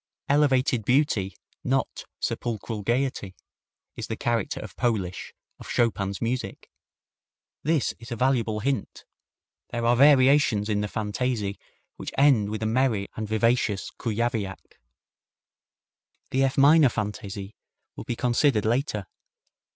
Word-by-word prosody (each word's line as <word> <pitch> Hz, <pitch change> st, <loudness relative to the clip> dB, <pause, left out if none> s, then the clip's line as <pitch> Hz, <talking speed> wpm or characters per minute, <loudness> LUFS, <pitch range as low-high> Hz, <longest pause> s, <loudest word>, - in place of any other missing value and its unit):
"Elevated 135 Hz, -5 st, +2 dB
beauty, 120 Hz, -6 st, +1 dB, 0.3 s
not -, -, -1 dB
sepulchral 110 Hz, -2 st, -3 dB
gayety," 120 Hz, -3 st, -1 dB, 0.6 s
is -, -, -6 dB
the -, -, -3 dB
character 115 Hz, -4 st, -1 dB
of 100 Hz, -5 st, -9 dB
Polish, 105 Hz, -7 st, -2 dB, 0.3 s
of -, -, -11 dB
Chopin's 100 Hz, -4 st, 0 dB
music. 115 Hz, -4 st, -4 dB, 0.9 s
This 155 Hz, -2 st, +1 dB
is 115 Hz, +2 st, -12 dB
a -, -, -2 dB
valuable 115 Hz, -3 st, +1 dB
hint. 135 Hz, -4 st, -3 dB, 0.6 s
There 120 Hz, -1 st, -3 dB
are 120 Hz, +1 st, +4 dB
variations 130 Hz, -5 st, +5 dB
in 105 Hz, -1 st, +1 dB
the 105 Hz, -, -1 dB
Fantaisie 105 Hz, -1 st, -2 dB, 0.4 s
which -, -, -6 dB
end 130 Hz, -7 st, +4 dB
with 110 Hz, +1 st, -4 dB
a -, -, 0 dB
merry 110 Hz, -3 st, +1 dB
and 110 Hz, 0 st, -4 dB
vivacious 110 Hz, -2 st, +1 dB
Kujawiak. 110 Hz, -4 st, -3 dB, 1.5 s
The 135 Hz, +1 st, +3 dB
F 135 Hz, -, -2 dB
minor 145 Hz, +1 st, +6 dB
Fantaisie 105 Hz, -2 st, -5 dB, 0.4 s
will -, -, -7 dB
be 120 Hz, -, -3 dB
considered 120 Hz, -2 st, +2 dB
later. 115 Hz, -3 st, 0 dB
115 Hz, 120 wpm, -26 LUFS, 105-130 Hz, 1.5 s, minor